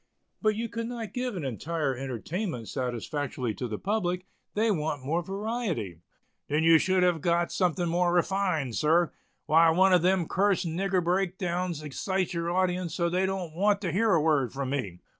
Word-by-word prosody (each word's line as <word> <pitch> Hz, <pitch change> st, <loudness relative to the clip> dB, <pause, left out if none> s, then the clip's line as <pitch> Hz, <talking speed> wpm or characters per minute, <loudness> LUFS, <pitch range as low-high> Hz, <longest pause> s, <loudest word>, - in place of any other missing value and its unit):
"But 215 Hz, -1 st, +2 dB
you 230 Hz, +2 st, -2 dB
could 230 Hz, 0 st, -4 dB
not 235 Hz, -3 st, -6 dB
give 250 Hz, -3 st, -2 dB
an 160 Hz, -, -4 dB
entire 140 Hz, +3 st, -2 dB
entertainment 135 Hz, -, -4 dB
satisfactorily 125 Hz, -1 st, -3 dB
to 125 Hz, -, -4 dB
the 110 Hz, -2 st, -4 dB
public; 185 Hz, -, -1 dB, 0.3 s
they 220 Hz, +1 st, +2 dB
want 150 Hz, -6 st, -2 dB
more 165 Hz, +5 st, 0 dB
variety." 195 Hz, -, -3 dB, 0.5 s
"Then 150 Hz, +2 st, +1 dB
you 165 Hz, 0 st, +7 dB
should 185 Hz, +1 st, +2 dB
have 175 Hz, -3 st, +2 dB
got 170 Hz, +1 st, +1 dB
something 180 Hz, -1 st, 0 dB
more 175 Hz, +1 st, +2 dB
refined, 175 Hz, -, 0 dB
sir. 165 Hz, +2 st, +3 dB, 0.3 s
Why, 165 Hz, +1 st, +5 dB
one 185 Hz, +3 st, +4 dB
of 180 Hz, -, +5 dB
those 185 Hz, 0 st, +2 dB
cursed 195 Hz, -1 st, +1 dB
nigger 180 Hz, +2 st, 0 dB
break 185 Hz, +1 st, 0 dB
downs 175 Hz, -3 st, -2 dB
excites 185 Hz, +5 st, -2 dB
your 170 Hz, 0 st, -2 dB
audience 180 Hz, -1 st, 0 dB
so 170 Hz, -1 st, +1 dB
they 185 Hz, +2 st, +1 dB
don't 185 Hz, -4 st, -3 dB
want 200 Hz, +4 st, +2 dB
to 185 Hz, -4 st, -2 dB
hear 215 Hz, +6 st, +2 dB
a -, -, +4 dB
word 145 Hz, -6 st, +2 dB
from 135 Hz, -1 st, -3 dB
me. 100 Hz, -11 st, -3 dB
175 Hz, 180 wpm, -28 LUFS, 150-190 Hz, 0.5 s, you